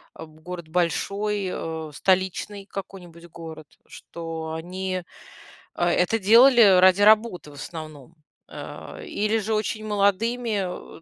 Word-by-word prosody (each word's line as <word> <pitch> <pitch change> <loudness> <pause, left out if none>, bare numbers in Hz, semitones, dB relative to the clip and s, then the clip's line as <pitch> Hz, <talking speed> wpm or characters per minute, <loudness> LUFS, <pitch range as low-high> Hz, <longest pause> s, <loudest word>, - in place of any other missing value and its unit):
э, - - -9
в 155 0 -16
город 170 -1 -8
большой, 195 +4 -1
э, 160 -1 -5
столичный 190 +3 -1
какой-нибудь 175 -4 -9
город, 160 -2 -10 0.2
что 165 -1 -7
они, 185 +2 -4 0.7
а, 175 0 +1
это 200 +5 +1
делали 235 +5 +6 0.2
ради 185 +2 +5
работы, 215 -7 +3
в - - -14
основном. 155 0 -9 0.3
А, - - -9
или 215 +2 -1
же 220 +1 -2
очень 215 0 -2
молодыми, 210 0 -1
э, - - -29
185 Hz, 125 wpm, -24 LUFS, 165-210 Hz, 0.7 s, делали